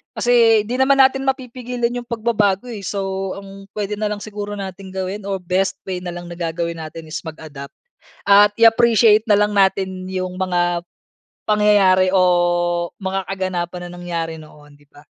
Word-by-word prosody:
kasi 230 -3 +4
'di 245 - -2
naman 270 +1 +3
natin 270 0 +4
mapipigilan 250 -2 -2
yung 245 -1 -6
pagbabago 220 -2 0
eh. 220 -5 -7
So, 195 -1 -3
ang 195 0 -13
pwede 210 0 -3
na 210 0 -2
lang 210 - -4
siguro 205 0 -6
natin 190 0 -7
gawin 190 +2 -4
or 195 -1 -3
best 185 +2 -1
way 180 -1 -4
na 175 - -4
lang 175 0 -8
na 170 - -8
gagawin 170 0 -3
natin 160 0 -8
is 155 - -6
mag-adapt 155 -4 -9 0.6
at 205 +1 +7
i-appreciate 225 -1 +5
na 205 - +5
lang 210 0 +1
natin 190 -1 +1
yung 185 -1 -3
mga 175 -2 0 0.6
pangyayari 205 -3 +4
o 190 0 +3 0.8
mga 190 0 -2
kaganapan 180 -2 -3
na - - -8
nangyari 165 -2 -3
noon, 150 -1 -16
'di 145 0 -24
ba? 145 +1 -19
195 Hz, 165 wpm, -20 LUFS, 175-215 Hz, 0.8 s, at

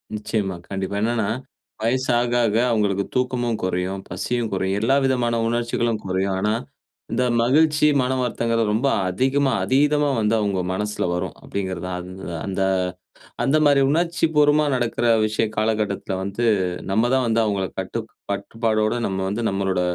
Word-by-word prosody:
நிச்சயமா, 105 -3 -2
கண்டிப்பா. 95 0 -3
என்னான்னா, 115 -2 0 0.5
வயசு 130 +4 0
ஆக 120 0 0
ஆக 105 -1 0 0.2
அவுங்களுக்கு 100 -3 +1
தூக்கமும் 125 -2 0
குறையும், 95 +1 -2
பசியும் 115 +6 -2
குறையும். 95 +1 0
எல்லா 125 +5 +3
விதமான 125 -3 +1
உணர்ச்சிகளும் 120 -1 0
குறையும். 95 +1 0
ஆனா 105 +2 +1 0.6
இந்த 125 - +1 0.2
மகிழ்ச்சி, 150 +5 +4
மனம் 130 0 0
வருத்தம்ங்கிறது 115 -3 0
ரொம்ப 115 +6 +1 0.2
அதிகமா, 135 +8 +1
அதீதமா 145 +2 +3
வந்து 105 0 +1
அவுங்க 100 -3 0
மனசுல 105 +2 -2
வரும். 90 +1 -3
அப்படிங்கிறது 95 -3 -4
தான். 90 -1 -3
அந்த 95 +1 -10 0.2
அந்த 95 0 -2 0.8
அந்த 135 +5 +3
மாதிரி 140 -1 +5
உணர்ச்சி 170 +2 +1
பூர்வமா 150 0 +4
நடக்கிற 120 -1 -1 0.2
விஷய 110 +1 0
காலகட்டத்ல 105 -3 -1
வந்து, 100 +5 -2 0.5
நம்ம 110 +5 +2
தான் 130 -1 +2
வந்து 115 0 +2
அவுங்கள 100 -3 0
கட்டுக் 110 +4 -4 0.2
கட்டுபாடோடு 110 +2 0
நம்ம 95 -1 -3
வந்து 110 +4 -2
நம்மளோட 95 -1 0
110 Hz, 145 wpm, -22 LUFS, 100-125 Hz, 0.8 s, மாதிரி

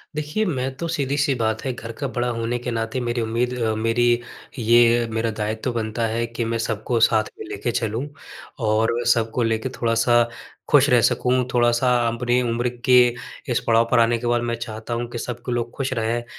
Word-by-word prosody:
देखिए, 150 +8 -1
मैं 135 -7 -2
तो, 170 - -3
सीधी-सी 145 -2 0
बात 110 -1 0
है, 130 - 0
घर 115 -1 -8
का 140 - -1
बड़ा 120 +1 -1
होने 115 +1 -2
के 125 0 -4
नाते 115 +2 -2
मेरी 120 0 -1
उम्मीद 115 +2 -1
अ, 110 -2 0
मेरी 115 +2 +1 0.5
ये 120 +1 +4
मेरा 110 0 -1
दायित्व 110 +4 -2
बनता 115 0 -2
है 115 +1 -1
कि 115 0 -4
मैं 115 0 -1
सबको 115 +1 -1
साथ 110 -1 +4 0.2
में - - -6
लेके 105 +4 -3
चलूँ 115 +4 -2 0.6
और 110 +2 +2
सबको 115 0 +2
लेके 115 +2 -1
थोड़ा-सा 120 -1 +2 0.5
खुश - - +5
रह - - +5
सकूँ, 125 0 +2
थोड़ा-सा 120 +1 +3 0.2
अपनी 120 +2 +1
उम्र 120 0 0 0.2
के 125 -1 +6 0.5
इस 120 - +2
पड़ाव 115 0 +4
पर 120 - +4
आने 115 0 +3
के 120 - -4
बाद, 120 0 +2
मैं 120 0 -2
चाहता 115 0 -6
हूँ 120 +1 -2
कि 120 - -5
सब 120 0 -5
क - - -5
लोग 120 -1 -2
खुश 135 -1 -1
रहें। 115 0 -1
अ, - - -16
120 Hz, 200 wpm, -22 LUFS, 115-125 Hz, 0.6 s, के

